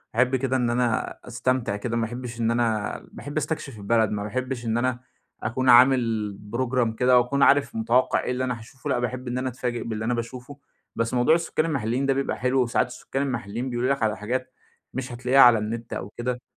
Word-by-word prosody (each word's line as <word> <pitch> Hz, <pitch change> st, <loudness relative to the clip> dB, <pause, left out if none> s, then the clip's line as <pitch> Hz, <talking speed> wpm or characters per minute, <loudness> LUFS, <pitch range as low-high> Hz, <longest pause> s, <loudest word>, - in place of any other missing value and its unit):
أحب 125 Hz, +2 st, +3 dB
كده 130 Hz, 0 st, 0 dB
إن 120 Hz, -2 st, +1 dB
أنا 120 Hz, -1 st, 0 dB
أستمتع 125 Hz, -2 st, -1 dB
كده 115 Hz, +3 st, -3 dB
ما 115 Hz, -, +1 dB
أحبش 120 Hz, 0 st, -7 dB
إن 115 Hz, 0 st, +1 dB
أنا 115 Hz, -3 st, 0 dB
باحب 145 Hz, +1 st, -7 dB
أستكشف 150 Hz, -4 st, -3 dB
البلد 110 Hz, +1 st, +2 dB
ما 105 Hz, -1 st, -2 dB
باحبش 125 Hz, +3 st, -3 dB
إن 115 Hz, 0 st, 0 dB
أنا 125 Hz, 0 st, 0 dB, 0.4 s
أكون 130 Hz, +3 st, 0 dB
عامل 120 Hz, -5 st, +4 dB, 0.2 s
program 125 Hz, -2 st, 0 dB
كده، 125 Hz, +2 st, +4 dB
وأكون 130 Hz, +3 st, +1 dB
عارف 140 Hz, +1 st, +4 dB
متوقِّع 115 Hz, +3 st, +2 dB
إيه -, -, -2 dB
اللي 125 Hz, +1 st, -1 dB
أنا 125 Hz, -2 st, -2 dB
هاشوفه 120 Hz, +3 st, -9 dB
لأ، 125 Hz, -, +1 dB
باحب 125 Hz, +1 st, -3 dB
إن 125 Hz, +1 st, -2 dB
أنا 130 Hz, 0 st, -1 dB
أتفاجئ 120 Hz, -1 st, -3 dB
باللي 110 Hz, -1 st, -4 dB
أنا 125 Hz, -, +1 dB
باشوفه، 125 Hz, +4 st, -6 dB, 0.4 s
بس 115 Hz, +1 st, -1 dB
موضوع 125 Hz, +6 st, +4 dB
السُكّان 165 Hz, -2 st, 0 dB
المحلّيين 130 Hz, -4 st, -1 dB
ده 135 Hz, -, +3 dB
بيبقى 135 Hz, +1 st, -2 dB
حلو 130 Hz, +1 st, +1 dB
وساعات 120 Hz, 0 st, +1 dB
السُكّان 135 Hz, +2 st, -5 dB
المحلّيين 120 Hz, -2 st, -3 dB
بيقولوا 120 Hz, +1 st, -1 dB
لك 135 Hz, -, -3 dB
على 110 Hz, -1 st, +1 dB
حاجات، 130 Hz, +5 st, -3 dB, 0.4 s
مش 130 Hz, -1 st, -4 dB
هتلاقيها 125 Hz, +3 st, +1 dB
على 120 Hz, -2 st, +8 dB
النت 115 Hz, +2 st, -5 dB
أو 95 Hz, -, -5 dB
كده. 125 Hz, +1 st, -3 dB
125 Hz, 205 wpm, -25 LUFS, 115-130 Hz, 0.4 s, على